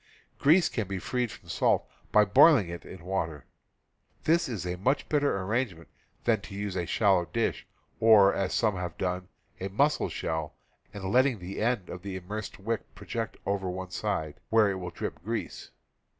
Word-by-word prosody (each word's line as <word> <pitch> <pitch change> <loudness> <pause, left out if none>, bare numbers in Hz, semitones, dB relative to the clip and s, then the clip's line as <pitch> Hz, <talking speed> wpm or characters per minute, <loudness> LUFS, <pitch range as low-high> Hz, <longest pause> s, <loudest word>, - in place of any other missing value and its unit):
Grease 160 +5 +5
can 110 -5 -3
be 95 0 -3
freed 125 +5 -1
from - - -12
salt - - +2 0.2
by 105 0 +6
boiling 105 - +6
it 85 0 -7
in 90 -2 -11
water. 80 -6 -2 0.8
This 165 -2 +2
is 105 -7 -4
a 90 0 -2
much 130 +10 0
better 145 -8 +2
arrangement 100 -5 -2 0.3
than 110 -4 +2
to 100 - -9
use 100 -1 -3
a 90 -2 -2
shallow 95 -5 +3
dish, 115 +7 -2 0.3
or, 105 -3 +7
as 95 -2 -1
some 110 -4 +2
have 90 -1 -5
done, 90 -1 -2 0.3
a 95 - -3
mussel 140 +10 +2
shell, 80 -2 -3 0.4
and 100 -2 -8
letting 130 +1 +4
the 95 +2 -6
end 115 -5 0
of 90 - -7
the 95 0 -5
immersed 105 +3 -6
wick 110 +2 -4
project 115 -2 -4
over 100 -1 -1
one 95 0 -5
side, 80 -8 -2
where 110 -3 +4
it 95 - -3
will 90 -1 -5
drip 85 - -6
grease. 115 +3 -4
100 Hz, 180 wpm, -29 LUFS, 90-115 Hz, 0.8 s, or